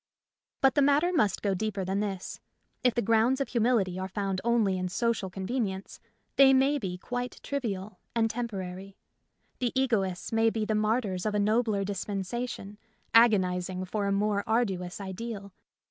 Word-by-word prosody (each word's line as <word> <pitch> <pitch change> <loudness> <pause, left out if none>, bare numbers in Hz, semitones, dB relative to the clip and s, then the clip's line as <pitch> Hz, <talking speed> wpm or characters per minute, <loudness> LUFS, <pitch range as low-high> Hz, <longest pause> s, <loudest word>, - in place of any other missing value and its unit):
But 270 -1 +5
the 290 - +3
matter 290 +6 +3
must 210 - +1
go 200 -2 +2
deeper 200 0 -2
than 190 +2 -1
this. 195 -3 -4 0.4
If 250 -2 +3
the 240 - +1
grounds 230 +5 +3
of 275 - -1
humility 225 -7 +1
are 190 - -3
found 195 -1 -2
only 230 -5 +2
in 185 0 -2
social 230 -1 0
convenience, 195 0 -3 0.4
they 270 -1 +8
may 275 +2 +3
be 185 -6 -4
quite 245 +5 -4
trivial 210 -8 -4 0.2
and 225 -1 +3
temporary. 195 -4 -5 0.6
The 245 -2 0
egoists 195 -9 0
may 225 0 +3
be 220 -1 -2
the 215 - 0
martyrs 215 -3 0
of 210 - -1
a - - +2
nobler 215 -1 +2
dispensation, 205 +2 -4 0.3
agonizing 185 -5 +3
for 200 +2 -2
a - - +1
more 200 0 +1
arduous 195 -6 0
ideal. 200 0 -6
210 Hz, 160 wpm, -29 LUFS, 190-235 Hz, 0.6 s, they